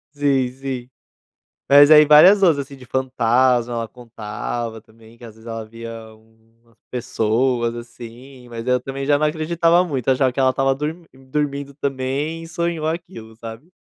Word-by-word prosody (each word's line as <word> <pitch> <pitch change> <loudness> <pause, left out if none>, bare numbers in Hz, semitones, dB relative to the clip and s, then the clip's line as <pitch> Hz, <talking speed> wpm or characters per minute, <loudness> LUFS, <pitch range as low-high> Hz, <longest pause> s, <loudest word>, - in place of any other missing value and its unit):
Sim, 140 -3 +1
sim. 130 -2 -6 0.8
Mas 145 +1 +7
aí 150 -1 +8
várias 180 +7 +7
outras, 160 -6 +4
assim, 140 -2 -12
de 125 - -14
fantasma, 125 -1 +1
ela 115 -1 -3
contava 115 -1 -6
também, 110 +1 -20
que 120 - -18
às 115 - -12
vezes 110 +1 -17
ela 115 -1 -6
via 115 +1 -10 1.0
pessoas, 120 0 0
assim, 120 +2 -12
mas 115 +1 -7
eu 125 0 +2
também 135 0 -6
já 145 0 +3
não 155 - 0
acreditava 165 +3 +2
muito, 135 -9 -4
achava 130 -1 +2
que 130 - -6
ela 130 -1 +4
estava 135 +1 0
dormin 155 +4 -5
dormindo 140 +1 -4
também 140 +4 -3
e - - -10
sonhou 170 -1 -3
aquilo, 115 -10 -6
sabe? 115 +10 -11
130 Hz, 160 wpm, -20 LUFS, 120-150 Hz, 1.0 s, aí